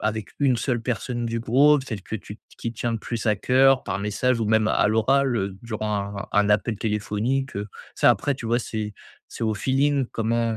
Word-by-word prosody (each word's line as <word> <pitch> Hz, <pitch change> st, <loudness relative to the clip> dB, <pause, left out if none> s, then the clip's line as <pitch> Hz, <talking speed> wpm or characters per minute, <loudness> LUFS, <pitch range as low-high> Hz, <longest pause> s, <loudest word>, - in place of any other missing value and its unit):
avec 110 Hz, -1 st, -2 dB
une 135 Hz, -3 st, +3 dB
seule 120 Hz, 0 st, -1 dB
personne 120 Hz, +1 st, -2 dB
du 115 Hz, 0 st, -2 dB
groupe, 135 Hz, +5 st, +4 dB
celle 110 Hz, -7 st, -5 dB
que 105 Hz, -, -7 dB
tu 105 Hz, +1 st, -10 dB, 0.2 s
qui 115 Hz, -, -4 dB
te 115 Hz, -, -19 dB
tient 120 Hz, -1 st, -1 dB
plus 115 Hz, +1 st, -5 dB
à 105 Hz, -, +4 dB
cœur, 130 Hz, +4 st, +4 dB
par 95 Hz, -, -2 dB
message 110 Hz, +5 st, 0 dB
ou -, -, +1 dB
même 110 Hz, 0 st, +3 dB
à -, -, +3 dB
l'oral, 125 Hz, +4 st, +2 dB
heu, 95 Hz, -2 st, -2 dB
durant 105 Hz, -3 st, -3 dB
un 100 Hz, -, -6 dB
un 105 Hz, 0 st, +3 dB
appel 105 Hz, +1 st, +1 dB
téléphonique, 110 Hz, +5 st, -1 dB
heu. 100 Hz, +1 st, -3 dB, 0.3 s
Ça, -, -, +5 dB
après 140 Hz, -, +1 dB
tu 115 Hz, -, -7 dB
vois 120 Hz, +2 st, +1 dB
c'est 105 Hz, -2 st, -4 dB, 0.3 s
c'est -, -, -8 dB
au 110 Hz, -, +1 dB
feeling 135 Hz, +4 st, +1 dB
comment 115 Hz, 0 st, 0 dB
115 Hz, 210 wpm, -24 LUFS, 105-125 Hz, 0.3 s, Ça